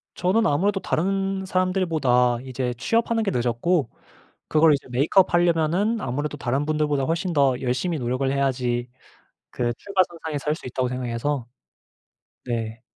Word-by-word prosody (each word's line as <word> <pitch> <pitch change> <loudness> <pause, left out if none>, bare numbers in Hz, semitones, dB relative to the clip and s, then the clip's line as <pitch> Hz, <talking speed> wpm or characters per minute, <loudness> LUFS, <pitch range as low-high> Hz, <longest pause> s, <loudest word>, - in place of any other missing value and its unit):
저는 190 +5 +2
아무래도 195 +8 +1
다른 195 +2 -1
사람들보다 165 -11 +1
이제 130 -1 -3
취업하는 230 - +1
게 200 - 0
늦었고 125 +4 0 0.6
그걸 155 0 +5
이제 140 - -3
메이크업 155 +11 +3
하려면은 175 +6 +2
아무래도 145 +4 -3
'다른 135 +2 -1
분들보다 150 -2 0
훨씬 170 +5 -1
더 140 -4 +3
열심히 130 +7 -1
노력을 130 +2 -1
해야지 125 -3 0 0.6
그 120 -1 -1
출발선상에 170 -6 -1
설 150 +2 -1
수 155 - -10
있다.'고 125 0 -1
생각해서 125 +1 -2 1.0
네. 115 -1 -3
150 Hz, 340 characters per minute, -24 LUFS, 125-180 Hz, 1.0 s, 그걸